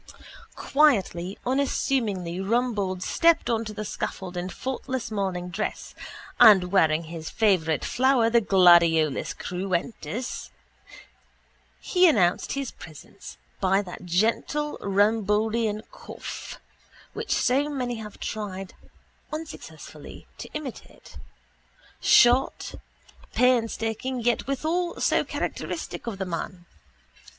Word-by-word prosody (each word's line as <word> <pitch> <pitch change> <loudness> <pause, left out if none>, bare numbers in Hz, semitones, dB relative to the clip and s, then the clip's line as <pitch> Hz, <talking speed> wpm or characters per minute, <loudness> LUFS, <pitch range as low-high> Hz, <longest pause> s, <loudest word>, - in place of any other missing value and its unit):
Quietly, 200 - +2
unassumingly 235 -9 0
Rumbold 205 -4 -1
stepped 330 - +3
on 225 -1 0
to 215 - -5
the 215 0 -5
scaffold 185 -2 -5
in 180 +1 -3
faultless 260 +2 -4
morning 190 -4 -2
dress 175 - -4 0.5
and 190 -4 +7
wearing 160 -4 +3
his 160 -1 -7
favourite 175 -8 +1
flower, 260 -2 +3
the 235 0 +4
Gladiolus 170 - +4
Cruentus. 195 +6 -4 1.3
He 365 -1 +4
announced 180 - +2
his 275 -3 -3
presence 160 -2 -12 0.2
by 195 +1 +2
that 180 -1 -9
gentle 225 - 0
Rumboldian 215 +2 +1
cough - - -8 0.5
which - - -5
so 275 +4 +2
many 250 -4 -3
have 210 -2 -9
tried 195 -3 -5 0.6
(unsuccessfully) 310 +1 -9
to - - -7
imitate—short, 265 - -1 0.6
painstaking 240 0 +1
yet 240 +1 0
withal 325 +6 -1
so - - +2
characteristic - - -5
of 220 -4 -4
the 190 - -3
man. 175 +1 -5
215 Hz, 100 wpm, -25 LUFS, 185-250 Hz, 1.3 s, and